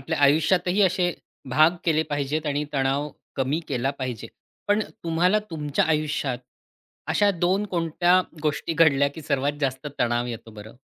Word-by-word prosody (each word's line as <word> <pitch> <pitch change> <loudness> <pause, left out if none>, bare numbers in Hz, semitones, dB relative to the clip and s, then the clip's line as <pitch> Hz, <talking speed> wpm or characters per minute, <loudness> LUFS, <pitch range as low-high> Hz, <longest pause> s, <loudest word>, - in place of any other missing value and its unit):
आपल्या 155 +3 -3
आयुष्यातही 175 +7 +3
असे 180 -1 +2 0.4
भाग 155 +7 +4
केले 160 -2 +2
पाहिजेत 145 +2 -1
आणि 145 +1 0
तणाव 140 +1 0 0.3
कमी 135 +5 0
केला 135 0 0
पाहिजे. 120 -4 -4 0.4
पण 210 +1 +3 0.2
तुम्हाला 175 +5 +2
तुमच्या 150 -3 0
आयुष्यात 150 -5 -1 0.7
अशा 205 -1 +3
2 185 +3 +1
कोणत्या 175 +1 +2 0.2
गोष्टी 150 +2 -1
घडल्या 145 -4 +4
की 160 - -8
सर्वात 140 +1 0
जास्त 135 +1 -2
तणाव 120 0 +1
येतो 115 -1 -7
बरं? 110 +2 -12
150 Hz, 145 wpm, -24 LUFS, 135-170 Hz, 0.7 s, भाग